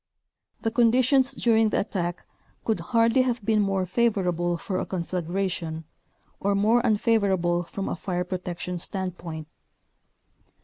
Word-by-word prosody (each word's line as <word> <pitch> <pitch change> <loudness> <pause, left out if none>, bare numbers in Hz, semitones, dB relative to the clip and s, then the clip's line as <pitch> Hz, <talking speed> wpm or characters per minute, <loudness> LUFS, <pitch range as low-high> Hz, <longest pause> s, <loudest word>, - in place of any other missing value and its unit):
The 225 - 0
conditions 255 +3 +4
during 225 -3 +3
the - - +1
attack 175 -4 -3 0.4
could 220 - +1
hardly 230 +1 +3
have 245 -4 -1
been 215 -1 +3
more 195 -2 0
favorable 180 -5 +1
for 185 +2 -3
a - - -2
conflagration, 175 -2 -3 0.6
or 200 0 +1
more 220 +4 +3
unfavorable 200 -6 +2
from 195 +3 -5
a - - -2
fire 180 -2 -2
protection 180 -1 -4
standpoint. 175 -4 -5
195 Hz, 125 wpm, -26 LUFS, 175-225 Hz, 0.6 s, conditions